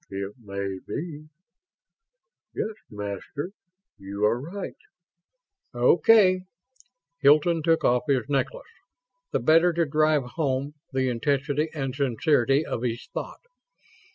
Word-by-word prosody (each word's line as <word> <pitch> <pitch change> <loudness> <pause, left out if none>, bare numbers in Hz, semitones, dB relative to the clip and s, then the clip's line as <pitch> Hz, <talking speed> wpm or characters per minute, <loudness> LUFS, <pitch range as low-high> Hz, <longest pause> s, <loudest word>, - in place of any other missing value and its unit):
"It 100 +1 -5
may 100 -3 -5
be.... 155 -2 -6 1.3
Yes, 220 - -2 0.2
Master, 105 - -5 0.5
you 100 +2 -2
are 115 +3 +2
right." 185 +7 -6 1.0
"Okay." 185 - +5 0.8
Hilton 155 +4 +4
took 165 +1 +2
off 125 +3 +2
his 135 -4 +1
necklace, 145 - -1 0.6
the - - 0
better 165 +3 +5
to 170 0 +1
drive 155 0 +2
home 135 +1 -2 0.2
the 130 -1 0
intensity 140 +5 0
and 135 -3 -2
sincerity 135 +1 +2
of 115 - -3
his 120 -1 -3
thought. - - -6
140 Hz, 110 wpm, -26 LUFS, 120-155 Hz, 1.3 s, Okay